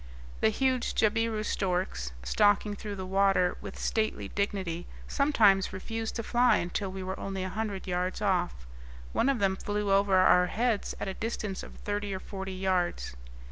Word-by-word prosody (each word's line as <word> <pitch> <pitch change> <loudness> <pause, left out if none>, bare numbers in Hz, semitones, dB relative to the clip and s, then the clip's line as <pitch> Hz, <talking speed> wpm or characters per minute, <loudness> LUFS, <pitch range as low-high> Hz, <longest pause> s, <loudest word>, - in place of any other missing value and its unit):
The - - +4
huge 255 +2 0
jabiru 220 0 +1
storks, 180 - -1
stalking 205 - +3
through 205 0 -6
the 190 -1 -5
water 195 -1 +3
with - - -8
stately 220 -1 -1
dignity, 190 -4 -2 0.2
sometimes 220 -10 +4
refused 225 +4 -4
to 230 - -2
fly 245 +2 +4
until 185 +3 -2
we 190 0 -5
were 190 +1 -4
only 195 -1 -3
a 185 - -3
hundred 205 -1 -3
yards 180 0 -1
off; 180 - 0 0.5
one 275 - +2
of 275 - +2
them 195 -3 +2
flew 205 +1 -2
over 195 0 +4
our 180 -1 +6
heads 225 +2 0
at - - -3
a 190 - -2
distance 210 -2 -3
of - - -10
thirty 205 -1 -3
or - - -4
forty 190 0 -6
yards. 185 - -1
195 Hz, 170 wpm, -29 LUFS, 185-215 Hz, 0.5 s, our